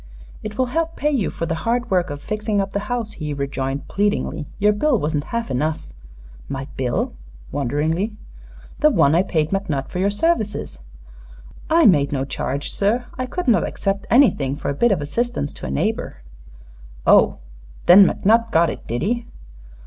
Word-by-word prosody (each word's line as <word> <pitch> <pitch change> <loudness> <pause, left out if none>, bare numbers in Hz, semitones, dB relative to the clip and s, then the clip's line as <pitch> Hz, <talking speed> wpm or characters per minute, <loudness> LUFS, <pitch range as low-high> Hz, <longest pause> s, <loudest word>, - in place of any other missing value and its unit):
"It 215 0 -7
will 255 - +2
help 330 0 -1
pay 300 - 0
you 250 -9 0
for 165 - -4
the 165 - -2
hard 240 0 -1
work 180 -2 +2
of 145 0 -5
fixing 215 -1 -1
up 195 0 -2
the 200 - 0
house," 240 -3 -2
he 150 -2 -5
rejoined, 140 0 -3
pleadingly. 200 -7 -1
"Your 210 +1 +3
bill 255 +5 +2
wasn't 150 -4 -1
half 235 0 -3
enough." 150 +5 -1 0.6
"My 135 0 -4
bill?" 125 -2 -1 0.4
wonderingly. 155 - -1 0.6
"The 305 - +5
one 150 - +3
I 170 - +4
paid 160 -5 -1
McNutt 160 -9 -2
for 180 - -4
your 195 +2 +2
services." 210 - -1 0.9
"I 330 0 +5
made 145 -7 +4
no 135 -2 -1
charge, 140 +1 -4
sir. 225 +5 +1
I 255 - -2
could 360 +5 -4
not 235 - +4
accept 195 0 -2
anything 190 - +4
for - - -4
a - - 0
bit 235 +11 +2
of 185 -6 +1
assistance 230 -1 -2
to - - -7
a - - -5
neighbor." 65 -2 -2 0.8
"Oh! - - +5 0.5
Then 190 +2 +9
McNutt 230 +3 +2
got 165 -4 +3
it, - - -10
did 120 +4 -2
he?" 235 +4 -1
195 Hz, 175 wpm, -21 LUFS, 145-230 Hz, 0.9 s, Then